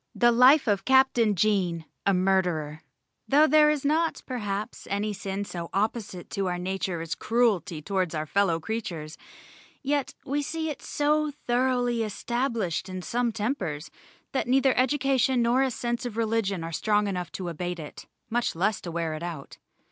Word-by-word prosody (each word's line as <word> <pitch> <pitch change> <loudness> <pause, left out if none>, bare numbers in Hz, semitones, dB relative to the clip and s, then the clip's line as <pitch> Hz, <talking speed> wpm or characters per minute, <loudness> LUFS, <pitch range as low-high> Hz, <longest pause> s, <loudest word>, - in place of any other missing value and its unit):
The 240 -1 +5
Life 255 +5 +6
of 200 -2 +1
CAPTAIN 265 -5 +4
JAEN, 180 -4 +1 0.2
a 200 - +5
Murderer 180 -5 0 0.5
Though 295 +3 +6
there 305 0 +6
is 300 -2 -1
not 320 +3 +1
perhaps 210 -5 -4
any 205 +2 -1
sin 200 0 -4
so 170 -3 -6
opposite 205 -3 -2
to 195 -1 -1
our 180 0 -1
nature 185 -1 -2
as 165 -1 -3
cruelty 200 -9 0
towards 185 -2 -1
our 155 0 -2
fellow 175 0 +1
creatures, 170 -6 -5 0.7
yet 280 0 -1
we 285 +2 0
see 320 +2 -3
it 285 - -8
so 300 +1 +1
thoroughly 245 -3 0
established 225 -3 -2
in 185 -1 -5
some 240 +3 0
tempers, 205 - -3 0.4
that 265 - -1
neither 265 +1 +3
education 265 -1 +2
nor 240 +3 +3
a 270 - +2
sense 240 0 -3
of 240 -3 -5
religion 215 -5 0
are 165 - -5
strong 210 +5 +1
enough 180 -3 -3
to 185 - -5
abate 175 +1 -4
it, 155 -3 -9 0.2
much 235 -3 -1
less 200 +5 0
to 175 - -6
wear 165 -1 -2
it 155 - -6
out. 170 -5 -7
210 Hz, 165 wpm, -27 LUFS, 180-255 Hz, 0.7 s, Life